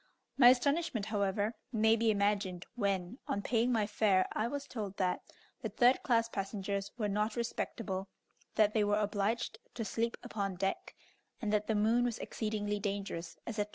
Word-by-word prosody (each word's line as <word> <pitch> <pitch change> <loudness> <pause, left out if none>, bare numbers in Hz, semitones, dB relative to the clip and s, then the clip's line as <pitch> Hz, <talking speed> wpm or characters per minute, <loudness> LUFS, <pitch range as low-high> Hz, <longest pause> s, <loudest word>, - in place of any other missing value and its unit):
My 245 -2 +9
astonishment, 270 -2 +2
however, 205 0 0 0.2
may 220 -1 +4
be 230 0 +2
imagined 200 -3 +1
when, 200 0 -1
on 200 - -1
paying 240 +1 +2
my 220 -3 +2
fare, 205 -3 +3
I 215 - 0
was 285 +2 -4
told 205 -5 -5
that 180 -1 0 0.4
the - - -2
third 250 +1 +4
class 230 -3 +2
passengers 200 -1 -3
were 215 -4 0
not 210 +2 0
respectable, 215 -4 -3 0.5
that 215 -1 +4
they 215 - +3
were 205 0 +2
obliged 210 +2 -1 0.2
to 225 - -3
sleep 230 +2 -1
upon 195 -3 -3
deck, 195 +1 -2 0.4
and 215 -3 -1
that 210 0 +1
the 220 - +1
moon 225 +4 +3
was 240 -2 0
exceedingly 210 -2 -2
dangerous, 195 -4 -4
etc. 210 -2 -2
210 Hz, 165 wpm, -33 LUFS, 200-230 Hz, 0.5 s, My